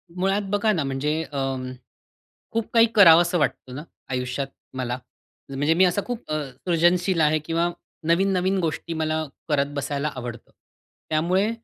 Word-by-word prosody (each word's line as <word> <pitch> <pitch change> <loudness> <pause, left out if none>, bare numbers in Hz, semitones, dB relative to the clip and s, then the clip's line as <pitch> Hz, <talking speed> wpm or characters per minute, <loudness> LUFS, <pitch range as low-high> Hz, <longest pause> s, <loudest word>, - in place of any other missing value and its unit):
मुळात 195 +3 +1
बघा 205 +2 +2
ना, 160 - 0
म्हणजे 150 +4 -1
अं, 135 -2 -3 0.8
खूप 225 -1 -1
काही 230 0 +7
करावसं 175 -2 +7
वाटतं 130 -3 -2
ना, 145 - -6 0.3
आयुष्यात 125 +2 -2 0.3
मला. 125 -1 -2 0.5
म्हणजे 145 +4 +1
मी 185 +3 +5
असा 180 +3 +1
खूप 245 -9 -6
अ, 155 - 0 0.2
सृजनशील 175 +1 +2
आहे 155 0 +3
किंवा 165 +1 +1 0.4
नवीन-नवीन 190 +2 +2
गोष्टी 165 0 -2
मला 160 0 -1 0.3
करत 145 -1 +1
बसायला 140 +1 -2
आवडतं. 120 -2 -7 0.6
त्यामुळे 180 +7 +2
160 Hz, 140 wpm, -24 LUFS, 140-180 Hz, 0.8 s, काही